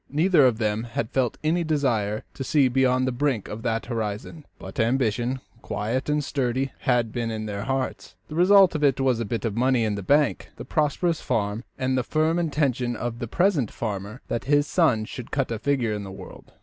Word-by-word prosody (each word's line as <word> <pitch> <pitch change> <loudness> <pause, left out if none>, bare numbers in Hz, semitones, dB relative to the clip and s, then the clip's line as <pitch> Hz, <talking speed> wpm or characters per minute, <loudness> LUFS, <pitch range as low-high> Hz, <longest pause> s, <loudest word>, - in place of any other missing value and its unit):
Neither 155 -1 +4
of 120 -3 +1
them 110 0 -1
had 115 -1 -3
felt 130 -3 0
any 165 +3 +1
desire 120 -9 0
to 135 - -5
see 140 0 +3
beyond 130 0 +2
the 130 - 0
brink 125 -4 -1
of 110 - -6
that 115 -1 -1
horizon; 115 +6 -4
but 140 - -9
ambition, 120 +1 +1 0.2
quiet 120 +7 -2
and 150 0 +1
sturdy, 130 -1 -1
had 120 -3 +1
been 115 0 -2
in 110 -1 -4
their 100 -1 -4
hearts. 135 -1 -3
The - - -9
result 190 +2 +6
of 150 -1 -2
it 135 -3 +3
was 130 -3 +2
the 115 - -1
bit 115 +3 -3
of 110 -3 -2
money 125 0 +2
in 110 -1 0
the 100 - -3
bank, 145 +9 +2
the - - -8
prosperous 155 +2 0
farm, 105 +1 -1
and 130 0 0
the 130 - +2
firm 160 +5 +1
intention 135 -7 0
of 120 0 -4
the 120 - -4
present 170 - +2
farmer 105 +1 -5
that 115 - -3
his 145 +1 +3
son 130 -11 +2
should 120 +1 -8
cut 135 -4 -1
a 115 - -2
figure 125 -4 0
in 105 -1 -4
the 95 - -8
world. 95 -1 -11
125 Hz, 210 wpm, -25 LUFS, 115-145 Hz, 0.2 s, result